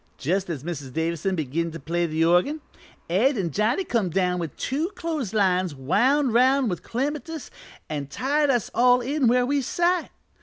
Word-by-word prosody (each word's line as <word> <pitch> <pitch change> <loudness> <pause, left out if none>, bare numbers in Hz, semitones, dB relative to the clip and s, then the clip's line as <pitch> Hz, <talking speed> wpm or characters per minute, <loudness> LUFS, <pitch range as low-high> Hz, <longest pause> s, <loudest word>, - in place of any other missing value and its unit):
"Just 185 +6 -1
as 150 -6 -4
Mrs. 145 -6 -6
Davison 170 +4 -1
begin 160 +2 -2
to 165 - -7
play 170 +4 -1
the 160 +1 +1
organ, 180 - +2 0.5
Ed 230 - +2
an' 175 -5 -1
Johnny 220 - +1
come 230 - 0
down 180 0 0
with 165 -5 -5
two 300 +7 -1
clothes 315 - -3
lines 185 -6 +1
wound 245 - +2
'round 260 0 +3
with 175 - -4
clematis 295 +5 -4 0.4
an' 145 -3 -4
tied 285 - 0
us 245 -5 +1
all 250 +1 +4
in 275 +1 0
where 250 +1 +3
we 280 +2 +1
sat. 345 +6 0
210 Hz, 175 wpm, -24 LUFS, 170-275 Hz, 0.5 s, all